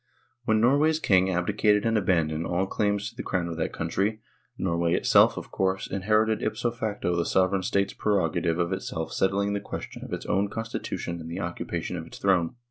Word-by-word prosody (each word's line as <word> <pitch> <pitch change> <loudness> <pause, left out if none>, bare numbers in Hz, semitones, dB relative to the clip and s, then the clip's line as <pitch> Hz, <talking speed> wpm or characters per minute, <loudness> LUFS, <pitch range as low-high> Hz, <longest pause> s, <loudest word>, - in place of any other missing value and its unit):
When 110 -1 +3
Norway's 145 +7 +3
king 95 -8 +3
abdicated 105 +4 +2
and 115 0 +2
abandoned 85 -5 +1
all 90 +2 0
claims 105 +1 0
to - - -27
the - - -5
crown 90 -2 -1
of 85 - -4
that 80 - -1
country, 100 +6 -1 0.4
Norway 85 -1 +1
itself, - - +5
of - - -7
course, 95 0 0
inherited 110 +2 +1
ipso 120 - -1
facto 105 -6 -2
the 85 - +1
sovereign 95 +2 +2
state's 100 +1 0
prerogative 85 -5 0
of 85 +1 0
itself 80 -4 -4
settling 100 +1 +1
the 100 - -1
question 100 - -7
of - - -9
its - - -4
own 100 +1 +1
constitution 105 -6 -4
and 80 - -8
the 85 - -5
occupa 85 -2 -4
tion 90 - -4
of 80 -1 -7
its - - -11
throne. 95 -1 +1
95 Hz, 195 wpm, -26 LUFS, 85-105 Hz, 0.4 s, itself